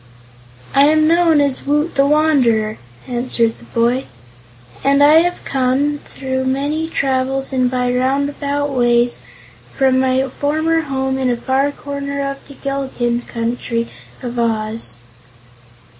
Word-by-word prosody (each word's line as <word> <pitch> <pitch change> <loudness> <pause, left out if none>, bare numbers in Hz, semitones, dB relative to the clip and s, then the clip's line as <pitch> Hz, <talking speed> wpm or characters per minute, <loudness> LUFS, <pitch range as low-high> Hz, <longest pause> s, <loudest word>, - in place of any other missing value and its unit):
"I 275 +1 +6
am 310 +1 +4
known 335 -2 +4
as 280 -2 0
Woot 295 +4 +1
the 275 0 +3
Wanderer," 260 -8 +2 0.3
answered 240 -2 0
the - - -15
boy, 240 +3 0 0.8
"and 280 +1 +4
I 305 +2 +7
have 350 +1 -2
come, 275 +3 0
through 260 -1 -4
many 290 +5 -1
travels 270 -1 -1
and 255 -1 +2
by 250 -1 0
roundabout 280 +2 -1
ways, 240 -1 +2 0.6
from 260 -1 +3
my 260 0 +1
former 315 +5 0
home 265 -2 -2
in 260 -1 +1
a 240 - 0
far 265 +3 +1
corner 280 0 -4
of 275 - -8
the 280 - -12
Gillikin 265 -4 -2
Country 235 0 -2 0.3
of 245 -1 -4
Oz." 225 -1 -2
270 Hz, 130 wpm, -18 LUFS, 245-285 Hz, 0.8 s, I